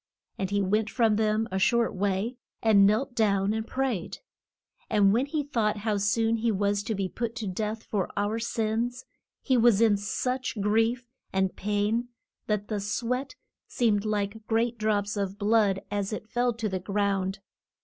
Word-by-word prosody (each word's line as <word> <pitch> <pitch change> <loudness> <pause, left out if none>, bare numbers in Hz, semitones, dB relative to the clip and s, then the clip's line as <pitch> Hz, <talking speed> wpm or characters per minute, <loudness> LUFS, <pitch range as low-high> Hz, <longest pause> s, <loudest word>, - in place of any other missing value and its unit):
And 190 -1 -1
he 200 0 +1
went 210 +3 +1
from 225 -4 +2
them 215 +1 +1
a 190 - -1
short 235 +4 +2
way, 200 +5 -1 0.3
and 205 -3 +6
knelt 240 +6 +1
down 200 -3 +2
and 220 0 -3
prayed. 255 -9 -2 0.7
And 200 -2 +4
when 250 +5 +1
he 295 0 -1
thought 230 -7 0
how 210 0 -1
soon 225 +3 +1
he 230 +1 +1
was 200 0 +1
to 220 - -1
be 195 -1 -1
put 230 +4 -4
to 230 -3 -4
death 215 +4 -3
for 195 -4 -2
our 205 +3 0
sins, 235 +2 -2 0.4
he 260 -2 +2
was 230 -3 +5
in 220 -3 +4
such 250 +4 -2
grief 225 +4 +1 0.2
and 190 -1 0
pain 210 +4 0 0.4
that 210 -1 -1
the 210 -2 -2
sweat 245 +6 -2 0.3
seemed 215 -4 +1
like 215 0 -2
great 230 +1 0
drops 205 -1 0
of 200 -1 -2
blood 205 -2 +2
as 205 0 -1
it 215 - -5
fell 245 0 +2
to 225 -1 -3
the 190 -2 -2
ground. 195 0 -1
215 Hz, 170 wpm, -27 LUFS, 200-230 Hz, 0.7 s, and